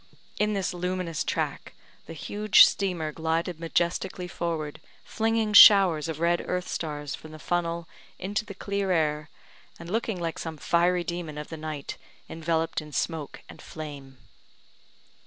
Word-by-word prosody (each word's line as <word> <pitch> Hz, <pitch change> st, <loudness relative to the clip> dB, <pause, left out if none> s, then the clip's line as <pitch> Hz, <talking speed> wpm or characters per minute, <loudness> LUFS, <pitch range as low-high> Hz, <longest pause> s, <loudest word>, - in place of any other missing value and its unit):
In 210 Hz, 0 st, +2 dB
this 195 Hz, -3 st, -1 dB
luminous 180 Hz, -2 st, -2 dB
track -, -, -3 dB, 0.3 s
the -, -, -7 dB
huge 205 Hz, +7 st, +5 dB
steamer 175 Hz, -6 st, -1 dB
glided 165 Hz, +1 st, -2 dB
majestically 175 Hz, +2 st, -1 dB
forward, 165 Hz, -4 st, -4 dB, 0.2 s
flinging 225 Hz, -1 st, 0 dB
showers 185 Hz, -7 st, +8 dB
of 160 Hz, -2 st, -4 dB
red 170 Hz, +1 st, +2 dB
earth 180 Hz, 0 st, -1 dB
stars 145 Hz, -3 st, -4 dB
from 155 Hz, 0 st, -9 dB
the -, -, -8 dB
funnel 170 Hz, +1 st, -2 dB, 0.3 s
into 200 Hz, +3 st, -2 dB
the 200 Hz, -2 st, -10 dB
clear 200 Hz, 0 st, -2 dB
air, 155 Hz, -2 st, 0 dB, 0.5 s
and 170 Hz, +1 st, -9 dB
looking 220 Hz, -3 st, -1 dB
like 165 Hz, -1 st, -3 dB
some 160 Hz, -1 st, -5 dB
fiery 175 Hz, +3 st, +2 dB
demon 170 Hz, -3 st, -5 dB
of 150 Hz, -, -6 dB
the 165 Hz, -, -6 dB
night 155 Hz, -2 st, -6 dB, 0.3 s
enveloped 165 Hz, 0 st, -1 dB
in 150 Hz, 0 st, -11 dB
smoke 155 Hz, 0 st, -3 dB
and -, -, -13 dB
flame. 140 Hz, -4 st, -9 dB
170 Hz, 145 wpm, -27 LUFS, 155-185 Hz, 0.5 s, showers